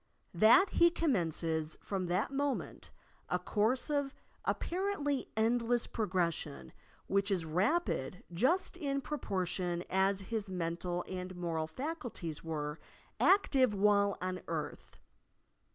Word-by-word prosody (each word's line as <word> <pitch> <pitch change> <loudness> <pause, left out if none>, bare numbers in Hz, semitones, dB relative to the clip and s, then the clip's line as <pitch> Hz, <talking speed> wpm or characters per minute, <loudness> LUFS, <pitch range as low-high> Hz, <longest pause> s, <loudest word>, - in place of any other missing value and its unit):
That 225 - +6
he 340 0 +6
commences 165 - 0
from 190 -3 -3
that 185 +8 0
moment 280 0 -2 0.4
a 180 - +2
course 215 +7 +1
of 285 -2 -1 0.3
apparently 340 -7 -1
endless 235 +1 +2
progression 170 - -2 0.3
which 195 +1 +1
is 185 -5 0
rapid 180 - 0
just 265 - +2
in 280 -5 -2
proportion 185 - -2
as 195 +1 +2
his 210 +1 -3
mental 175 0 -2
and 185 0 -5
moral 165 -3 -2
faculties 245 - -5
were 150 -1 -3 0.4
active 270 - +4
while 200 0 +3
on 185 0 -3
earth. 160 -3 -5
195 Hz, 110 wpm, -33 LUFS, 175-265 Hz, 0.4 s, That